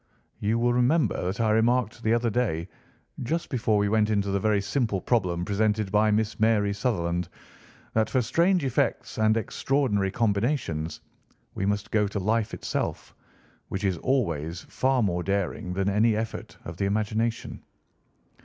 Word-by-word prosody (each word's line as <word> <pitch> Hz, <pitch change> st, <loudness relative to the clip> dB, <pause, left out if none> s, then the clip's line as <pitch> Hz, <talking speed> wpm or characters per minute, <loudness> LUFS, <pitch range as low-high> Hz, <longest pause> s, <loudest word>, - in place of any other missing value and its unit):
"You 110 Hz, +3 st, +1 dB
will 120 Hz, +1 st, +2 dB
remember 125 Hz, -, +2 dB
that 95 Hz, +5 st, -2 dB
I 110 Hz, -2 st, +2 dB
remarked 115 Hz, +1 st, +2 dB
the 110 Hz, 0 st, +2 dB
other 120 Hz, -1 st, 0 dB
day, 100 Hz, -9 st, -1 dB, 0.5 s
just 165 Hz, +7 st, -2 dB
before 115 Hz, -5 st, +1 dB
we 105 Hz, 0 st, +2 dB
went 110 Hz, 0 st, +2 dB
into 100 Hz, -2 st, +1 dB
the 100 Hz, -, +1 dB
very 105 Hz, 0 st, +2 dB
simple 100 Hz, 0 st, -1 dB
problem 90 Hz, -5 st, 0 dB
presented 105 Hz, 0 st, 0 dB
by 105 Hz, +1 st, +3 dB
Miss 105 Hz, 0 st, 0 dB
Mary 105 Hz, -2 st, +3 dB
Sutherland, 90 Hz, -6 st, -1 dB, 0.6 s
that 110 Hz, 0 st, +2 dB
for 130 Hz, -, +2 dB
strange 170 Hz, -, +2 dB
effects 130 Hz, -, -1 dB
and 110 Hz, 0 st, +3 dB
extraordinary 110 Hz, -3 st, 0 dB
combinations 100 Hz, -, -1 dB, 0.5 s
we 95 Hz, -, -2 dB
must 100 Hz, 0 st, -1 dB
go 105 Hz, -2 st, +2 dB
to 100 Hz, 0 st, -3 dB
life 110 Hz, +2 st, 0 dB
itself, -, -, -3 dB, 0.6 s
which 95 Hz, +1 st, -4 dB
is 95 Hz, -3 st, +1 dB
always 85 Hz, -, -1 dB
far 130 Hz, -2 st, +1 dB
more 90 Hz, -3 st, 0 dB
daring 100 Hz, +1 st, -2 dB
than 95 Hz, +1 st, -1 dB
any 105 Hz, +2 st, +3 dB
effort 110 Hz, +1 st, -5 dB
of 85 Hz, 0 st, -7 dB
the 100 Hz, -, 0 dB
imagination." 110 Hz, +3 st, -1 dB
105 Hz, 155 wpm, -26 LUFS, 100-115 Hz, 0.6 s, by